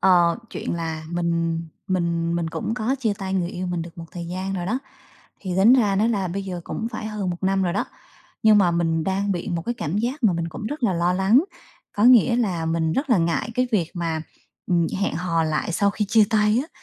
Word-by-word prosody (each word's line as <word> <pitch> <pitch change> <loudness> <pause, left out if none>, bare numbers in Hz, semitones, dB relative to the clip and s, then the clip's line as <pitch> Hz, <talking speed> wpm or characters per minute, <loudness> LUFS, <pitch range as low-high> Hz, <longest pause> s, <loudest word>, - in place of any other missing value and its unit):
Ờ, 175 -3 +4
chuyện - - -4
là 160 -2 -4
mình 170 -1 -1 0.3
mình 170 -3 0
mình 170 -1 -1
cũng 220 - -3
có 245 +2 0
chia 225 -5 0
tay 190 -2 -3
người 175 -2 0
yêu 185 +1 -4
mình 175 -2 -2
được 170 0 -11
một 165 - -6
thời 170 -1 -6
gian 185 +2 -4
rồi 175 -2 -3
đó. 235 +7 0 0.6
Thì 185 -3 -4
tính 205 +6 +6
ra 215 -7 +4
đó 215 - +3
là 200 -5 0
bây 195 +3 -3
giờ 180 -2 -5
cũng 225 - -4
phải 215 -1 -4
hơn 210 -4 -3
1 175 - -6
năm 190 0 +2
rồi 175 -2 0
đó, 200 - 0 0.6
nhưng 215 -1 +6
mà 185 -3 +4
mình 165 -2 0
đang 195 +2 0
bị 175 +1 -4
một 170 -1 -2
cái 240 - -1
cảm 190 -4 -2
giác 250 +6 -2
mà 205 - +5
mình 170 -1 -2
cũng 190 +6 -6
rất 295 +3 -5
là 220 -5 +3
lo 170 +1 +1
lắng, 195 - +4 0.5
có 205 - +1
nghĩa 240 -1 +6
là 185 -9 0
mình 160 0 0
rất 275 - -1
là 225 - +5
ngại 170 +6 0
cái 250 +1 +1
việc 175 -6 +1
mà, 165 -2 -2 0.4
ừm, 170 -2 +2
hẹn 200 - 0
hò 170 -1 0
lại 155 +2 -1
sau 200 +4 +2
khi 210 +1 -1
chia 220 0 +5
tay 215 0 +3
á, 310 - -11
185 Hz, 245 wpm, -23 LUFS, 170-215 Hz, 0.6 s, tính